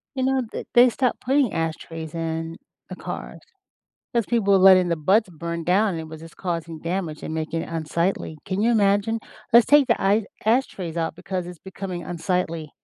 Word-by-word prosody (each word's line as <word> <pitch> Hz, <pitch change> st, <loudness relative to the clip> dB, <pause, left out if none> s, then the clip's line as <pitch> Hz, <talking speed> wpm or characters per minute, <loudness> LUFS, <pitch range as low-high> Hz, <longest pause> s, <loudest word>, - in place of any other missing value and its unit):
You 260 Hz, -, -2 dB
know, 265 Hz, -1 st, +1 dB
th -, -, -6 dB
they 245 Hz, +1 st, +8 dB
stopped 250 Hz, 0 st, -1 dB
putting 270 Hz, -3 st, +2 dB
ashtrays 160 Hz, 0 st, -4 dB
in 165 Hz, 0 st, -3 dB, 0.3 s
the -, -, -6 dB
cars -, -, -7 dB, 0.7 s
'cause 235 Hz, -4 st, +1 dB
people 210 Hz, -5 st, +2 dB
were 190 Hz, -, +5 dB
letting 185 Hz, -2 st, +7 dB
the 170 Hz, -, +1 dB
butts 195 Hz, +7 st, +2 dB
burn 170 Hz, 0 st, -5 dB
down 200 Hz, +5 st, +3 dB
and 165 Hz, -, -4 dB
it 160 Hz, -, -7 dB
was 160 Hz, 0 st, -10 dB
just 165 Hz, -, -13 dB
causing 170 Hz, -3 st, -4 dB
damage 170 Hz, -3 st, -3 dB
and 160 Hz, -, -4 dB
making 160 Hz, +1 st, -2 dB
it -, -, -9 dB
unsightly. 165 Hz, 0 st, -2 dB
Can 190 Hz, +2 st, -2 dB
you 230 Hz, -, +3 dB
imagine? 205 Hz, +1 st, +2 dB, 0.3 s
"Let's 235 Hz, 0 st, +7 dB
take 290 Hz, -2 st, +5 dB
the 235 Hz, -, +2 dB
I 200 Hz, +2 st, +2 dB, 0.2 s
ashtrays 200 Hz, -8 st, 0 dB
out 165 Hz, -1 st, -2 dB
because 180 Hz, 0 st, -4 dB
it's 180 Hz, -2 st, -9 dB
becoming 190 Hz, -2 st, -6 dB
unsightly." 170 Hz, -3 st, -2 dB
180 Hz, 190 wpm, -23 LUFS, 165-215 Hz, 0.7 s, they